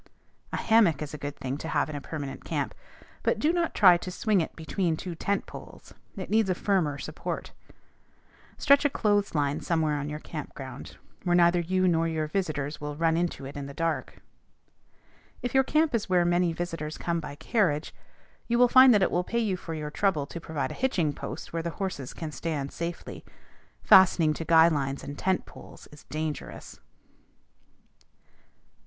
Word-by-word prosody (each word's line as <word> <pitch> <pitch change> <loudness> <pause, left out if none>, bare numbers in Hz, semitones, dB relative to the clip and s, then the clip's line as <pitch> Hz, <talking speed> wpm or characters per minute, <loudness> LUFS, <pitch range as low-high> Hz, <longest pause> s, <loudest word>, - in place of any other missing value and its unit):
A - - -2
hammock 210 -10 +3
is 150 - -8
a - - -5
good 145 0 -5
thing 135 +1 -4
to 160 - -6
have 145 -3 +1
in 155 - -6
a 145 - -5
permanent 140 -3 -6
camp, - - -2 0.5
but - - +1
do 310 +3 +2
not 345 -2 -1
try 180 -4 +7
to 180 - -7
swing 200 +1 +1
it 160 - -5
between 165 0 -1
two 180 +1 -5
tent 200 +4 -1
poles: - - -12 0.2
it - - -6
needs 220 -2 +3
a 185 - +1
firmer 175 -8 0
support. - - -5 1.1
Stretch 280 0 +5
a 290 - +3
clothes 205 -7 +1
line 145 0 0
somewhere 160 -3 0
on 145 +1 -4
your 150 - -4
camp 155 -1 -8
ground, 130 -1 -9 0.3
where 175 -2 +2
neither 175 0 +5
you 185 +2 +1
nor 165 -1 +2
your 160 -1 -1
visitors 150 -4 -3
will 150 0 -4
run 165 +1 +2
into 170 -5 -2
it 135 - -8
in 140 -1 -5
the 140 - -10
dark. 165 0 -3 1.2
If 245 - -2
your 265 0 +5
camp 310 +2 +2
is 215 -4 -1
where 180 -1 +3
many 175 0 +2
visitors 165 -2 -4
will - - -12
come 170 -1 0
by 150 -2 -7
carriage, 155 -2 0 0.5
you 235 - +1
will 245 0 +6
find 255 -1 +8
that 200 - +4
it - - +1
will 175 - +1
pay 235 - -3
you 215 -5 +1
for 165 -2 -6
your 150 -1 -5
trouble 160 -5 +1
to 170 +4 -8
provide 160 -2 -3
a - - -9
hitching 175 - +1
post 145 +4 -7
where 165 - -1
the 170 - -3
horses 185 -10 -4
can 160 -2 -6
stand 145 -1 -3
safely. 170 0 -6 0.6
Fastening 175 -4 +6
to 165 - -6
guy 165 0 +7
lines 140 -4 -1
and 145 - -6
tent 185 +4 0
poles - - -13
is 150 - -15
dangerous. 155 0 -5
165 Hz, 190 wpm, -27 LUFS, 150-190 Hz, 1.2 s, find